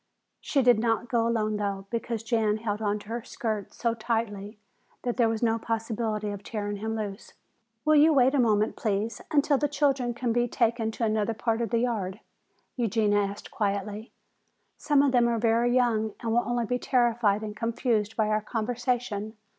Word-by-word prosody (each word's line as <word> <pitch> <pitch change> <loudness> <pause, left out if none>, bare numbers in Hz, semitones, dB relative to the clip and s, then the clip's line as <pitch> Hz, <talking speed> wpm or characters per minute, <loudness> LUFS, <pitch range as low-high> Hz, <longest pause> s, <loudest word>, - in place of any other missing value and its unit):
She 275 -3 +1
did 245 -3 +5
not 230 +1 0
go 230 -1 +2
alone 215 -2 0
though, 200 -2 -3
because 230 -1 -3
Jan 225 -2 +1
held 215 -1 -3
on 205 -1 0
to 210 - -13
her 235 +1 -3
skirts 215 -4 -4
so 235 -1 +1
tightly 220 -2 -3 0.5
that 245 -1 -2
there 235 -3 +4
was 225 +1 -2
no 225 -1 +2
possibility 220 -2 -2
of 200 -1 -6
tearing 205 -1 -4
him 220 +2 -3
loose. 205 -3 -6 0.5
"Will 310 0 +5
you 305 +2 +6
wait 265 -2 +4
a 285 - +2
moment, 215 -3 +2
please, 210 0 -2
until 290 -2 +3
the 295 - +1
children 275 -4 0
can 240 -1 -1
be 240 +1 +2
taken 230 -1 +1
to 225 +1 -4
another 220 0 0
part 225 +1 -1
of 230 - -1
the 230 - +1
yard?" 210 -5 -2 0.6
Eugenia 215 -3 +2
asked 200 0 -4
quietly. 205 +1 -2 0.6
"Some 290 -2 +2
of 280 - +3
them 240 -2 +4
are 235 -1 +1
very 230 +1 +2
young 230 -4 +1
and 230 - -2
will 235 +1 +3
only 240 -1 0
be 250 +2 -1
terrified 235 -5 +2
and 210 -1 -5
confused 225 -1 -1
by 215 -1 +2
our 215 0 +1
conversation. 230 -1 -2
225 Hz, 185 wpm, -27 LUFS, 210-240 Hz, 0.6 s, you